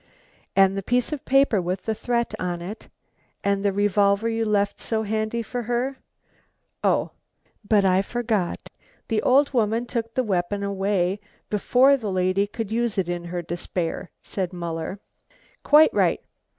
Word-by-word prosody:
"And 195 Hz, 0 st, +5 dB
the 195 Hz, -, -2 dB
piece 245 Hz, +7 st, 0 dB
of 290 Hz, -, -6 dB
paper 270 Hz, -7 st, +3 dB
with 180 Hz, +2 st, -3 dB
the 220 Hz, -, -1 dB
threat 235 Hz, +1 st, -1 dB
on 175 Hz, -1 st, -2 dB
it? 190 Hz, +6 st, -8 dB, 0.5 s
and 200 Hz, 0 st, +1 dB
the 200 Hz, -, +2 dB
revolver 205 Hz, +1 st, +2 dB
you 225 Hz, 0 st, 0 dB
left 205 Hz, -1 st, +1 dB
so 220 Hz, -1 st, -1 dB
handy 220 Hz, +2 st, -1 dB
for 245 Hz, +2 st, -4 dB
her? 245 Hz, +3 st, -1 dB, 0.9 s
oh, -, -, +2 dB, 0.5 s
but 205 Hz, -1 st, +3 dB
I 185 Hz, 0 st, +4 dB
forgot, 220 Hz, -4 st, -2 dB, 0.4 s
the 220 Hz, -2 st, +1 dB
old 280 Hz, +2 st, +3 dB
woman 230 Hz, 0 st, +1 dB
took 230 Hz, -2 st, -4 dB
the 255 Hz, -, +2 dB
weapon 200 Hz, -1 st, -1 dB
away 195 Hz, -1 st, 0 dB, 0.3 s
before 255 Hz, +6 st, +4 dB
the 215 Hz, -6 st, -4 dB
lady 185 Hz, +2 st, +1 dB
could 220 Hz, 0 st, -5 dB
use 235 Hz, -1 st, 0 dB
it 185 Hz, -3 st, 0 dB
in 175 Hz, 0 st, -3 dB
her 175 Hz, 0 st, -4 dB
despair," 175 Hz, +1 st, -4 dB
said 185 Hz, -3 st, -3 dB
Muller. 170 Hz, +2 st, -4 dB, 0.6 s
"Quite 305 Hz, +2 st, +6 dB
right. -, -, +2 dB
205 Hz, 155 wpm, -24 LUFS, 190-235 Hz, 0.9 s, Quite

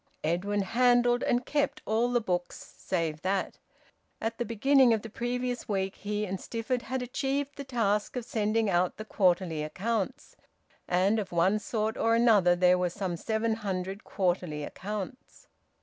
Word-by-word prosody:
Edwin 195 Hz, +6 st, 0 dB
handled, 245 Hz, +2 st, +3 dB
and 245 Hz, +1 st, +1 dB
kept, 290 Hz, -1 st, -1 dB
all 230 Hz, +3 st, +1 dB
the 245 Hz, -, +3 dB
books 180 Hz, -5 st, -4 dB
save 165 Hz, -4 st, -2 dB
that. 190 Hz, +1 st, -1 dB, 0.6 s
At 225 Hz, +1 st, -3 dB
the 240 Hz, -, 0 dB
beginning 255 Hz, +3 st, +4 dB
of 215 Hz, -, -5 dB
the 225 Hz, -, -8 dB
previous 245 Hz, +1 st, -3 dB
week 195 Hz, -1 st, -1 dB
he 210 Hz, +1 st, -2 dB
and 190 Hz, -1 st, -4 dB
Stifford 240 Hz, +2 st, -2 dB
had 255 Hz, +1 st, -3 dB
achieved 275 Hz, +3 st, -2 dB
the 280 Hz, -, -6 dB
task 220 Hz, -6 st, 0 dB
of 245 Hz, -2 st, -3 dB
sending 220 Hz, -1 st, 0 dB
out 180 Hz, -1 st, +1 dB
the 215 Hz, -, -6 dB
quarterly 180 Hz, -6 st, +1 dB
accounts, 215 Hz, -, -3 dB, 0.5 s
and 190 Hz, +5 st, +2 dB
of 195 Hz, -3 st, -4 dB
one 180 Hz, +5 st, +3 dB
sort 220 Hz, +1 st, -2 dB
or 230 Hz, 0 st, +3 dB
another 210 Hz, -7 st, +5 dB
there 180 Hz, 0 st, +4 dB
were 180 Hz, -1 st, +1 dB
some 180 Hz, 0 st, -3 dB
seven 220 Hz, +5 st, -1 dB
hundred 195 Hz, -1 st, -4 dB
quarterly 175 Hz, -5 st, -1 dB
accounts. 210 Hz, -, -7 dB
210 Hz, 160 wpm, -29 LUFS, 185-240 Hz, 0.6 s, another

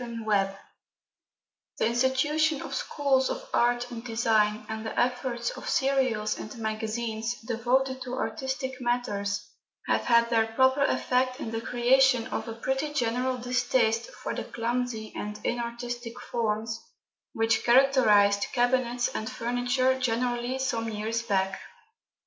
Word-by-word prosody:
FURNITURE 215 Hz, -5 st, -1 dB, 1.2 s
The -, -, +1 dB
institution 270 Hz, +6 st, +1 dB
of -, -, -7 dB
schools 270 Hz, -2 st, +1 dB
of -, -, -5 dB
art 240 Hz, +1 st, +2 dB
and 230 Hz, -1 st, -6 dB
design, 220 Hz, -3 st, +1 dB
and 220 Hz, 0 st, -5 dB
the 220 Hz, -, -3 dB
efforts 245 Hz, -1 st, 0 dB
of -, -, -7 dB
serials 255 Hz, -6 st, +1 dB
and 215 Hz, +3 st, -8 dB
magazines 220 Hz, +1 st, -3 dB
devoted 255 Hz, +3 st, 0 dB
to 250 Hz, 0 st, -4 dB
artistic 260 Hz, +3 st, -3 dB
matters, 205 Hz, -5 st, -1 dB, 0.4 s
have -, -, +1 dB
had 235 Hz, -1 st, +4 dB
their 225 Hz, -1 st, +3 dB
proper 260 Hz, +4 st, +3 dB
effect 255 Hz, -1 st, +1 dB
in 225 Hz, -, -4 dB
the 225 Hz, 0 st, -3 dB
creation 250 Hz, 0 st, +3 dB
of -, -, -3 dB
a 225 Hz, -, -4 dB
pretty 265 Hz, +5 st, -2 dB
general 250 Hz, 0 st, 0 dB
distaste 245 Hz, -, +1 dB
for -, -, -6 dB
the -, -, -3 dB
clumsy 235 Hz, -1 st, -3 dB
and 210 Hz, 0 st, -5 dB
inartistic 240 Hz, 0 st, -4 dB
forms 225 Hz, -1 st, -2 dB, 0.5 s
which 225 Hz, 0 st, +1 dB
characterised 235 Hz, -6 st, +5 dB
cabinets 245 Hz, -1 st, +1 dB
and 220 Hz, +2 st, -4 dB
furniture 250 Hz, +2 st, 0 dB
generally 245 Hz, +1 st, -1 dB
some 235 Hz, -4 st, -1 dB
years 220 Hz, +2 st, -2 dB
back. 195 Hz, -4 st, -1 dB
240 Hz, 130 wpm, -27 LUFS, 225-255 Hz, 1.2 s, characterised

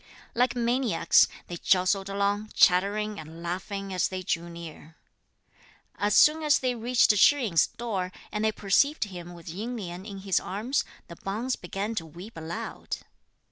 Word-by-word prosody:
Like 245 Hz, 0 st, +2 dB
maniacs, 240 Hz, -5 st, +3 dB, 0.2 s
they 175 Hz, -, -6 dB
jostled 190 Hz, +2 st, +2 dB
along, 200 Hz, +2 st, 0 dB
chattering 205 Hz, +3 st, +3 dB
and 160 Hz, +2 st, -10 dB
laughing 190 Hz, +3 st, -4 dB
as 180 Hz, -, +1 dB
they 185 Hz, -1 st, -5 dB
drew 170 Hz, 0 st, -2 dB
near. 165 Hz, -2 st, -10 dB, 1.0 s
As 205 Hz, 0 st, 0 dB
soon 310 Hz, +1 st, +6 dB
as 300 Hz, -1 st, +4 dB
they 255 Hz, -1 st, 0 dB
reached 235 Hz, -2 st, +3 dB
Shih 280 Hz, +7 st, +5 dB
yin's 170 Hz, -9 st, +3 dB
door, 195 Hz, -6 st, -4 dB, 0.2 s
and 210 Hz, 0 st, -2 dB
they 220 Hz, -, +3 dB
perceived 215 Hz, +10 st, +2 dB
him 175 Hz, -4 st, -8 dB
with 170 Hz, -2 st, -14 dB
Ying 215 Hz, +9 st, -4 dB
Lien 180 Hz, -3 st, -6 dB
in 200 Hz, -1 st, -8 dB
his 190 Hz, -2 st, +1 dB
arms, 225 Hz, +9 st, -2 dB, 0.2 s
the 170 Hz, -, -11 dB
Bonze 225 Hz, +6 st, -2 dB
began 195 Hz, +5 st, -4 dB
to 165 Hz, -7 st, -4 dB
weep 175 Hz, +8 st, -11 dB
aloud. 165 Hz, +1 st, -5 dB
200 Hz, 160 wpm, -27 LUFS, 175-230 Hz, 1.0 s, soon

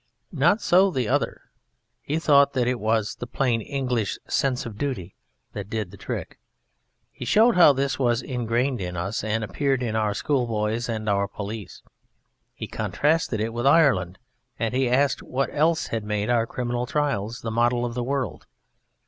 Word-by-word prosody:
Not 170 Hz, +8 st, +3 dB
so 190 Hz, +3 st, +5 dB
the 130 Hz, -, -1 dB
other: -, -, 0 dB, 0.6 s
he 150 Hz, -, -2 dB
thought 140 Hz, -3 st, +4 dB
that 125 Hz, -3 st, +1 dB
it 125 Hz, -1 st, 0 dB
was 110 Hz, 0 st, 0 dB
the 120 Hz, -, -6 dB
Plain 120 Hz, -3 st, 0 dB
English 125 Hz, -4 st, -2 dB
sense 130 Hz, -2 st, 0 dB
of 115 Hz, -3 st, -7 dB
Duty 105 Hz, -11 st, -3 dB, 0.4 s
that 100 Hz, -1 st, -6 dB
did 110 Hz, -5 st, -3 dB
the -, -, -11 dB
trick: -, -, -6 dB, 0.7 s
he -, -, -9 dB
showed 225 Hz, +2 st, +4 dB
how 175 Hz, -4 st, +8 dB
this 135 Hz, 0 st, -1 dB
was 120 Hz, -2 st, +1 dB
ingrained 125 Hz, 0 st, -1 dB
in 90 Hz, -1 st, -4 dB
us 95 Hz, +6 st, -3 dB
and 110 Hz, +1 st, -1 dB
appeared 135 Hz, +4 st, 0 dB
in 110 Hz, -2 st, -2 dB
our 105 Hz, -2 st, 0 dB
Schoolboys 115 Hz, -4 st, -1 dB
and 110 Hz, -1 st, -3 dB
our 100 Hz, -1 st, +1 dB
Police: 105 Hz, +1 st, -7 dB, 0.7 s
he -, -, -5 dB
contrasted 150 Hz, -6 st, 0 dB
it 110 Hz, +1 st, -2 dB
with 120 Hz, +3 st, 0 dB
Ireland, 125 Hz, -, +4 dB, 0.4 s
and 115 Hz, 0 st, -1 dB
he 130 Hz, -1 st, +1 dB
asked 135 Hz, +3 st, +2 dB
what 135 Hz, +2 st, -2 dB
else 160 Hz, +2 st, +2 dB
had 115 Hz, -2 st, -3 dB
made 105 Hz, +1 st, -1 dB
our 115 Hz, -1 st, +2 dB
Criminal 120 Hz, 0 st, -3 dB
Trials 120 Hz, -7 st, -1 dB
the 115 Hz, -, -4 dB
model 120 Hz, +1 st, +2 dB
of 120 Hz, -, -4 dB
the 125 Hz, 0 st, -2 dB
world? 135 Hz, 0 st, -3 dB
120 Hz, 175 wpm, -24 LUFS, 110-140 Hz, 0.7 s, how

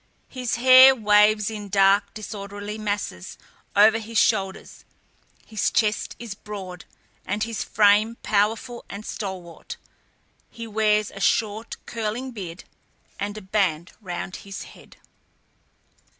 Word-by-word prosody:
His 250 Hz, -3 st, -3 dB
hair 260 Hz, +2 st, +8 dB
waves 210 Hz, -1 st, +3 dB
in 210 Hz, -2 st, -7 dB
dark, 195 Hz, +1 st, +3 dB
disorderly 205 Hz, 0 st, -7 dB
masses 205 Hz, -, -4 dB, 0.4 s
over 215 Hz, +2 st, +6 dB
his 225 Hz, 0 st, -5 dB
shoulders; 190 Hz, -1 st, 0 dB, 0.6 s
his 215 Hz, -3 st, -1 dB
chest 210 Hz, -2 st, 0 dB
is 230 Hz, -3 st, -7 dB
broad, 195 Hz, -4 st, -9 dB, 0.4 s
and 205 Hz, +3 st, -2 dB
his 225 Hz, -2 st, -3 dB
frame 210 Hz, +2 st, +3 dB
powerful 225 Hz, +4 st, 0 dB
and 205 Hz, +2 st, -8 dB
stalwart; 185 Hz, -5 st, -7 dB, 0.7 s
he 230 Hz, -1 st, -8 dB
wears 215 Hz, -1 st, +1 dB
a 195 Hz, -, -10 dB
short, 215 Hz, +2 st, 0 dB
curling 230 Hz, +3 st, -4 dB
beard, 185 Hz, -6 st, -8 dB, 0.6 s
and 205 Hz, +1 st, -4 dB
a 215 Hz, -, -8 dB
band 185 Hz, -4 st, -1 dB
round 185 Hz, -1 st, -5 dB
his 195 Hz, -1 st, -8 dB
head. -, -, -16 dB
210 Hz, 120 wpm, -24 LUFS, 200-220 Hz, 0.7 s, hair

